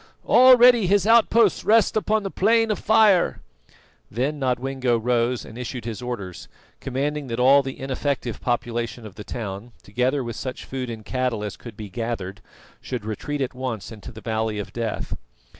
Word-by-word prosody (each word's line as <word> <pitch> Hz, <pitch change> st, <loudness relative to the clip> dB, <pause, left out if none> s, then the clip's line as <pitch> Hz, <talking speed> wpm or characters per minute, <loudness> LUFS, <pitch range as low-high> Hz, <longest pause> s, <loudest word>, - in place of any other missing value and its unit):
Already 245 Hz, -4 st, +7 dB
his 200 Hz, +1 st, +3 dB
outposts 225 Hz, -2 st, +4 dB
rest 220 Hz, 0 st, +3 dB
upon 215 Hz, 0 st, +1 dB
the 195 Hz, -, -4 dB
Plain 225 Hz, +2 st, +2 dB
of 210 Hz, -, -2 dB
Fire." 210 Hz, -4 st, +4 dB, 0.7 s
Then 135 Hz, +7 st, -2 dB
Nodwengo 130 Hz, -1 st, 0 dB
rose 120 Hz, +1 st, 0 dB
and 115 Hz, -, -10 dB
issued 125 Hz, -2 st, -6 dB
his 115 Hz, 0 st, -5 dB
orders, 110 Hz, -8 st, -6 dB, 0.3 s
commanding 140 Hz, +2 st, -3 dB
that 115 Hz, 0 st, -4 dB
all 135 Hz, +3 st, +6 dB
the 135 Hz, -1 st, -7 dB
ineffective 135 Hz, -2 st, -3 dB
population 120 Hz, -1 st, -2 dB
of 105 Hz, -, -10 dB
the 105 Hz, -, -9 dB
town, 110 Hz, +1 st, -6 dB
together 125 Hz, +6 st, 0 dB
with 120 Hz, -2 st, -5 dB
such 130 Hz, +2 st, -6 dB
food 130 Hz, -2 st, -5 dB
and 110 Hz, -2 st, -7 dB
cattle 125 Hz, -4 st, -2 dB
as 105 Hz, -1 st, -5 dB
could 115 Hz, -4 st, -12 dB
be 105 Hz, -, -7 dB
gathered, 100 Hz, -3 st, -5 dB, 0.4 s
should 120 Hz, -5 st, -5 dB
retreat 140 Hz, +7 st, -4 dB
at 130 Hz, -1 st, -2 dB
once 125 Hz, -5 st, -5 dB
into 110 Hz, -3 st, -10 dB
the 110 Hz, -, -12 dB
Valley 110 Hz, -1 st, -2 dB
of 105 Hz, -, -6 dB
Death. 115 Hz, -2 st, -3 dB
125 Hz, 170 wpm, -23 LUFS, 115-145 Hz, 0.7 s, Already